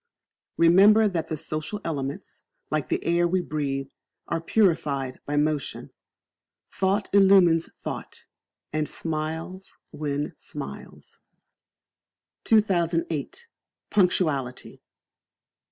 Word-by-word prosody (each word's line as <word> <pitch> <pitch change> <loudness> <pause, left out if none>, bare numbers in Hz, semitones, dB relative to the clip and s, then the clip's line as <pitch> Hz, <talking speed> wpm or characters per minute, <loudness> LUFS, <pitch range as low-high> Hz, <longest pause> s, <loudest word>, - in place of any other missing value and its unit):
Remember 200 +6 +6
that 175 -5 -2
the 155 - -3
social 155 +8 -4
elements, 140 -4 -5 0.3
like - - -1
the - - -1
air 175 0 +3
we 185 +2 +1
breathe, 140 -5 -3 0.4
are 165 - -2
purified 150 -9 +1
by 145 - -1
motion. 150 -1 -1 0.8
Thought 195 +1 0
illumines 190 -4 +5
thought, - - -7 0.5
and 155 -1 -1
smiles 160 +4 -5
win 145 -1 -3
smiles. 70 0 -9 1.3
2008. 170 - +1 0.5
Punctuality. 155 -10 0
165 Hz, 90 wpm, -25 LUFS, 150-185 Hz, 1.3 s, Remember